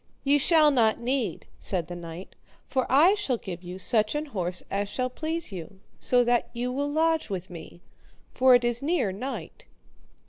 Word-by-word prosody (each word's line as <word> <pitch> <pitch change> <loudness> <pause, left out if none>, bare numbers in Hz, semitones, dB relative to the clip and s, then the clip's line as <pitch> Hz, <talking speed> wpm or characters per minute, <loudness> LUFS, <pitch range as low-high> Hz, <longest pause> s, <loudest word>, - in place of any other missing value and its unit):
Ye 285 +1 +3
shall 305 0 +5
not 230 -5 +2
need, 240 -6 -2
said 180 -4 0
the 175 +2 -8
knight, 170 +1 -9 0.3
for 260 -2 -1
I 315 +9 +6
shall 410 - -1
give 180 -5 -7
you 180 0 -8
such 215 +4 +1
an 300 +1 -1
horse 180 - -2
as 200 +1 -1
shall 255 +4 -2
please 320 0 -3
you, 185 +1 -9 0.2
so 250 -1 +3
that 240 0 +1
you 245 +1 -2
will 285 +3 -2
lodge 320 0 +1
with 185 -1 -5
me, 170 0 -11 0.5
for 255 -1 +5
it 245 - +3
is 240 +1 +1
near 295 - 0
night. 265 - -7
245 Hz, 180 wpm, -26 LUFS, 190-285 Hz, 0.5 s, I